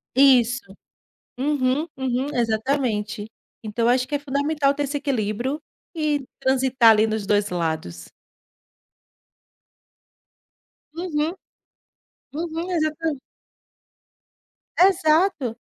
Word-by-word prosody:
Isso, 245 -5 +4 0.6
uhum, 280 +2 0
uhum, 260 0 -1
exatamente, 220 -2 -1 0.4
então 220 +2 -2
eu - - +4
acho 250 +1 +2
que 295 - -2
é - - 0
fundamental 285 0 0
ter 290 +1 -2
esse 285 +1 -2
equilíbrio 255 +1 -2 0.3
e 300 -3 0
transitar 260 -3 +4
ali 215 0 +4
nos 215 -2 -2
2 205 0 +2
lados. 160 - -4 2.8
Uhum, 325 -2 -2 1.0
uhum, 330 +3 -4
exata 310 -3 -1 1.6
Exato, 325 - +3
265 Hz, 90 wpm, -23 LUFS, 225-300 Hz, 2.8 s, Isso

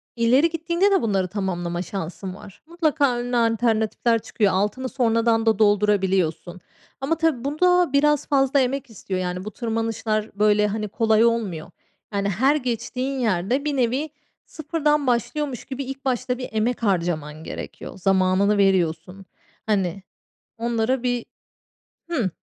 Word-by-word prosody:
ileri 250 +7 +4
gittiğinde 340 +4 +1
de 390 - +3
bunları 195 -5 0
tamamlama 175 -3 -3
şansın 185 0 -6
var. 195 -1 -14
Mutlaka 310 -6 +1
önüne 245 0 -1
alternatifler 230 0 +1
çıkıyor. 205 -2 0
Altını 210 +7 -1
sonradan 230 -2 +1
da 220 -2 +2
doldurabiliyorsun 195 -4 +1 0.4
ama 310 +5 0
tabii 320 -7 0
bu 290 +3 -3
da 360 -4 +4
biraz 295 0 +3
fazla 275 0 +3
emek 270 +1 -1
istiyor. 190 -3 -5
Yani, 180 +1 -3
bu 215 - -5
tırmanışlar, 225 -2 -2
böyle, 210 0 +3
hani, 210 +1 -3
kolay 220 +1 +3
olmuyor. 205 -9 -1 0.4
Yani, 200 0 0
her 260 +10 +2
geçtiğin 255 0 -3
yerde 230 +5 0
bir 295 -1 0
nevi 260 +5 0 0.4
sıfırdan 300 -2 -1
başlıyormuş 250 +2 -1
gibi 270 +1 -5
ilk 270 +1 -8
başta 255 -1 -1
bir 255 - -6
emek 225 +2 -1
harcaman 170 -6 -1
gerekiyor. - - -8
Zamanını 190 +2 +2
veriyorsun. 185 -1 +1 0.4
Hani 195 -3 -1 0.5
onlara 235 +2 0
bir 245 -2 -1 0.8
Hı. 255 - 0
225 Hz, 135 wpm, -23 LUFS, 195-265 Hz, 0.8 s, ileri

